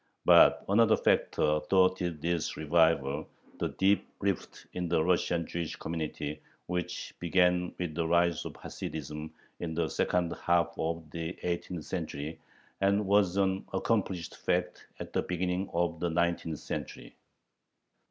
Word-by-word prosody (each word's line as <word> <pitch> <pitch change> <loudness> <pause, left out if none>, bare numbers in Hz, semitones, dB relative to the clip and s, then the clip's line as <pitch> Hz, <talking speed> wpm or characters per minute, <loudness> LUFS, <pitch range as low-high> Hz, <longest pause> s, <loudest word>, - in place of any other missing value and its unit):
But - - +7
another 110 +2 +5
factor 75 0 +2
thwarted 90 -4 +2
this 85 -1 -1
revival 80 -2 +2 0.3
the - - 0
deep 100 +1 +2
rift 100 -2 -2
in 90 -1 -3
the 80 -2 +3
Russian 85 -1 +1
Jewish 85 -1 -4
community, 80 -2 -4 0.2
which 90 0 -3
began 90 0 +2
with 90 -3 -3
the 80 0 -1
rise 85 -1 +2
of - - -7
Hasidism 75 0 -6 0.3
in 80 -2 -4
the 85 -1 +1
second 90 -2 0
half 85 0 +1
of 80 0 -3
the 85 +1 -4
eighteenth 85 -1 -3
century, 80 -3 -4 0.4
and 100 +1 +2
was 100 -1 +3
an 95 -1 +1
accomplished 95 -3 -1
fact - - -1
at - - -7
the - - +2
beginning 90 +1 -2
of 85 -1 0
the 85 - 0
nineteenth 85 -1 0
century. - - -6
85 Hz, 135 wpm, -30 LUFS, 80-90 Hz, 0.4 s, But